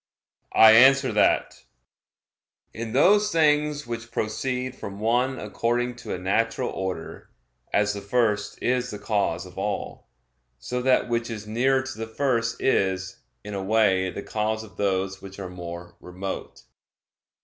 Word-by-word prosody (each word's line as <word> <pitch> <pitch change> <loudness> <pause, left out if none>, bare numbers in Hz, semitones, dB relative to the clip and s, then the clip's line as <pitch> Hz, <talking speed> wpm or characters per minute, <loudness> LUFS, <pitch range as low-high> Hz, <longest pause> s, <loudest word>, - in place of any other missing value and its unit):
I 110 0 +9
answer 130 +4 +6
that, - - +1 1.1
In 115 0 -5
those 205 +9 +4
things 150 -2 +2
which 115 -1 -6
proceed 125 +4 -2
from 100 -4 -8
one 125 +4 +1
according 120 +3 -1
to 125 - -5
a - - -5
natural 105 +5 0
order, 95 -3 -5 0.4
as 105 0 +2
the 100 - -6
first 105 0 0
is 125 0 +1
the 105 - -6
cause 100 -5 -1
of 90 +1 -10
all, 105 -8 -4 0.5
so 125 - -4
that 130 0 +3
which 120 0 -1
is 110 -2 -6
nearer 130 +5 +1
to 130 -3 -7
the 115 - -4
first 115 -1 -1
is, 95 -6 0 0.3
in 105 0 -7
a 100 - -3
way, 95 -3 +2
the 100 - -6
cause 110 0 -2
of 110 - -15
those 95 -1 -1
which 95 0 -10
are 95 -2 -6
more 85 -1 -8
remote. 95 +2 -7
110 Hz, 150 wpm, -25 LUFS, 95-125 Hz, 1.1 s, I